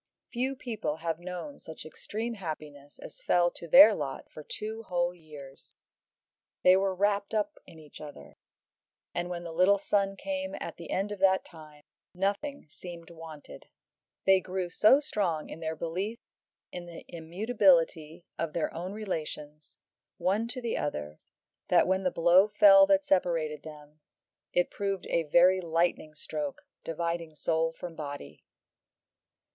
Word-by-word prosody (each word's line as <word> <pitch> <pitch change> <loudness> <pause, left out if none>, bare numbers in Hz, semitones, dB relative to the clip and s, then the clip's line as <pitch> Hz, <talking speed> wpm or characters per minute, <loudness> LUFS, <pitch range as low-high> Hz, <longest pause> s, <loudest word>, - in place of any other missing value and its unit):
Few 260 +2 -1
people 220 - -3
have 165 0 -3
known 180 +11 -7
such 160 - -10
extreme 220 +8 -5
happiness 150 -7 -8
as - - -12
fell 175 - +3
to 170 - -10
their 260 - +9
lot 145 -7 -5
for 155 - -9
two 215 +8 -5
whole 175 -4 -1
years. 150 -5 -13 0.9
They 185 0 +7
were 190 0 +1
wrapt 200 +2 0
up 210 -1 -1
in 165 - -14
each 155 -2 -13
other, 145 - -11 0.8
and 175 0 -2
when 175 -1 -5
the 170 - -6
little 185 +4 +4
son 195 0 0
came 285 +4 -4
at - - -6
the 170 - -10
end 195 +2 -1
of 205 - -5
that 190 0 +3
time, 155 -3 -14 0.3
nothing 205 +10 -2
seemed 170 -1 -10
wanted. 160 -3 -11 0.6
They 190 -1 +6
grew 185 -1 -4
so 215 +9 +6
strong 180 - -1
in - - -8
their 160 -1 -3
belief 185 +8 -3 0.5
in 175 -1 -7
the 170 -1 -10
immutability 170 -2 +1
of 165 -2 -2
their 165 - -1
own 180 +4 -5
relations, 155 -7 -6 0.4
one 205 +5 0
to 250 +2 -4
the 235 - -1
other, 75 - -4 0.5
that - - +5
when 190 +1 +1
the 185 - +1
blow 175 +4 +5
fell 290 +7 +7
that 295 -1 +3
separated 165 - +1
them, 150 -1 -12 0.5
it 175 - +1
proved 195 -2 -3
a 165 -3 -1
very 180 +4 +5
lightning 165 -2 0
stroke, 150 -1 -5 0.2
dividing 170 -1 -3
soul 160 +2 0
from 165 0 -8
body. 145 -2 -7
175 Hz, 150 wpm, -29 LUFS, 160-200 Hz, 0.9 s, their